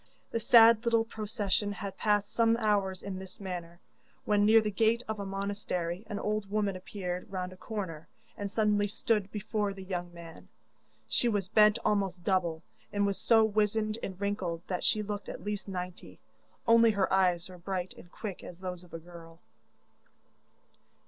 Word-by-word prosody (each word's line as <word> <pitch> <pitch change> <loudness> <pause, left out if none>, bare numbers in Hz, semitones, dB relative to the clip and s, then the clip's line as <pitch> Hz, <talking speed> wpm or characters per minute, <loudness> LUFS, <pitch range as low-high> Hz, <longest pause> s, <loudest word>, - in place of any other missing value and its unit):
The 230 - 0
sad 230 0 +7
little 230 -1 +3
procession 210 -2 -1
had 195 0 -6
passed 205 -1 +1
some 230 0 +3
hours 200 -4 0
in 190 -1 -5
this 190 -1 -10
manner, 175 -3 -6 0.5
when, 205 -1 +3
near 225 +1 +8
the 215 -1 -1
gate 225 +3 +2
of 220 -1 -3
a 200 - -4
monastery, 195 -2 -3
an 210 -2 -4
old 210 -1 -2
woman 205 -2 0
appeared 185 -1 -5
round 185 -1 -3
a - - -12
corner, 185 -6 -5 0.3
and 200 -1 -4
suddenly 210 -1 +2
stood 205 -1 0
before 210 -1 -2
the 190 - -8
young 175 -2 -4
man. 170 -1 -12 0.6
She 240 - +2
was 205 -4 0
bent 210 0 +6
almost 195 -4 0
double, 170 -4 0 0.3
and 205 0 +1
was 200 -1 -1
so 225 -2 +5
wizened 215 +1 +1
and 190 -1 -6
wrinkled 190 -5 -2
that 180 -2 -3
she 215 - +2
looked 205 -1 -5
at - - -7
least 205 -1 -4
ninety; 180 - -6 0.5
only 230 0 +7
her 200 -3 +1
eyes 180 -2 +3
were 180 -1 -12
bright 185 0 -3
and 175 - -15
quick 200 -5 -6
as 175 - -10
those 180 -1 -5
of 175 - -11
a - - -5
girl. 165 -1 -13
200 Hz, 175 wpm, -30 LUFS, 180-215 Hz, 0.6 s, near